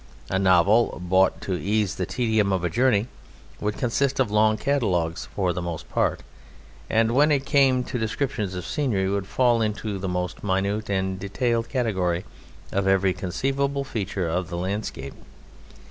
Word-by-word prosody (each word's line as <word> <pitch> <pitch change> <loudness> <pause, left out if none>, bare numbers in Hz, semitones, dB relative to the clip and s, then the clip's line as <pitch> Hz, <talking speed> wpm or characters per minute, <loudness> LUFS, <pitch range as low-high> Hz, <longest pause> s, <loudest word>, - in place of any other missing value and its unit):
A 95 - +1
novel 95 +4 +4
bought 95 +1 +2
to 95 - -3
ease 105 -1 0
the 90 - -3
tedium 110 -5 +1
of 95 -2 0
a 90 - 0
journey 115 -4 +3 0.5
would 105 0 -2
consist 135 +2 0
of 125 -6 +2
long 110 +1 +3
catalogues 95 -12 0
for 95 -3 +1
the 90 - -3
most 85 -2 -5
part, - - 0 0.7
and 115 0 +2
when 145 +5 +4
it 140 -2 +1
came 135 -3 +3
to 125 0 -4
descriptions 110 -3 -2
of 90 - -5
scenery 110 -10 0
would 100 0 -1
fall 120 -1 +2
into 105 -2 -2
the 95 0 -3
most 90 0 -3
minute 100 +2 -1
and 95 -1 -1
detailed 115 +4 -1
category 95 - 0 0.5
of 95 0 0
every 95 -1 +3
conceivable 135 +10 -1
feature 95 -7 -3
of 85 +1 -2
the 85 - -4
landscape. 90 -7 -4
100 Hz, 160 wpm, -24 LUFS, 95-120 Hz, 0.7 s, novel